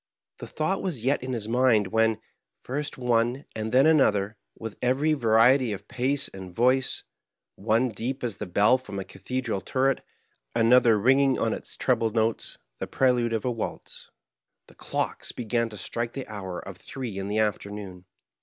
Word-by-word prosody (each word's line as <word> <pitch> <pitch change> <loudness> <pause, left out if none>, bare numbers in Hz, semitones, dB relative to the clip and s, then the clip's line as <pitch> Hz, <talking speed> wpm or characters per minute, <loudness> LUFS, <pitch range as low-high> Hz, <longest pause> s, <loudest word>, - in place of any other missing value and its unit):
The - - -7
thought 185 +5 -1
was 140 - -3
yet 135 - +2
in 130 +1 -4
his 110 -3 -3
mind, 115 -4 +3
when, 110 0 +2 0.4
first 145 +3 -4
one 120 +1 +1
and 110 0 -3
then 130 +3 +5
another, 110 -10 +3 0.2
with 110 -2 -7
every 135 +5 +2
variety 120 -1 +4
of 100 +1 -8
pace 130 +3 +1
and 95 -2 -10
voice— 125 +3 +2 0.5
one 115 - +1
deep 120 +5 -4
as 115 -5 -2
the 105 - -5
bell 105 +8 +4
from 105 -6 -8
a 95 - -3
cathedral 110 +2 -4
turret, 135 +4 0 0.5
another 115 -1 +5
ringing 135 +5 +4
on 115 - 0
its - - -8
treble 115 -3 +1
notes 110 0 -1 0.2
the - - -3
prelude 125 -3 +2
of 115 0 -2
a 125 - +1
waltz 115 -2 -6 0.3
— - - -59
^the - - -18
clocks - - -3
began 115 0 -1
to 105 - -10
strike 115 +4 -3
the 135 - -5
hour 95 -4 -6
of - - -9
three 120 -7 -6
in 95 - -4
the 105 +1 -2
afternoon. 100 -3 -3
115 Hz, 175 wpm, -26 LUFS, 105-130 Hz, 0.5 s, then